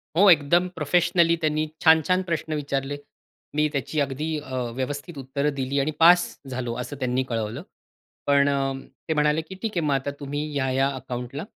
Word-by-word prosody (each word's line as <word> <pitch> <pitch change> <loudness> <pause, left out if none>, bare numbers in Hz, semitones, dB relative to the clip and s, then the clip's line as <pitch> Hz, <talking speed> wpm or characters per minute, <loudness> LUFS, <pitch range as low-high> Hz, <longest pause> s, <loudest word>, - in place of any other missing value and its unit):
हो, 195 +3 +6
एकदम 170 +3 +4
प्रोफेशनली 170 +2 +3
त्यांनी 155 0 +1 0.2
छान-छान 160 +3 +5
प्रश्न 160 -1 -2
विचारले. 140 -1 -2 0.6
मी 150 0 +3
त्याची 140 +2 -2
अगदी 140 +2 -1
अ, 130 -3 -4
व्यवस्थित 145 +4 -4
उत्तरं 140 +2 -2
दिली 135 +1 -1
आणि 150 +3 0
पास 175 +2 +8 0.3
झालो, 125 -2 -3
असं 140 +4 -6
त्यांनी 130 0 0
कळवलं. 115 +6 -3 0.6
पण 140 0 +4
अ, 140 -1 +1 0.5
ते 160 - +1
म्हणाले, 150 +1 +2
की 190 +4 -10
"ठीक 225 -2 -2
हे, 170 - +1
मग 145 -2 +1
आता 135 +1 -2
तुम्ही 145 +1 -3
ह्या-ह्या 135 -1 +1
अकाउंटला 125 +2 -5
145 Hz, 165 wpm, -25 LUFS, 135-160 Hz, 0.6 s, पास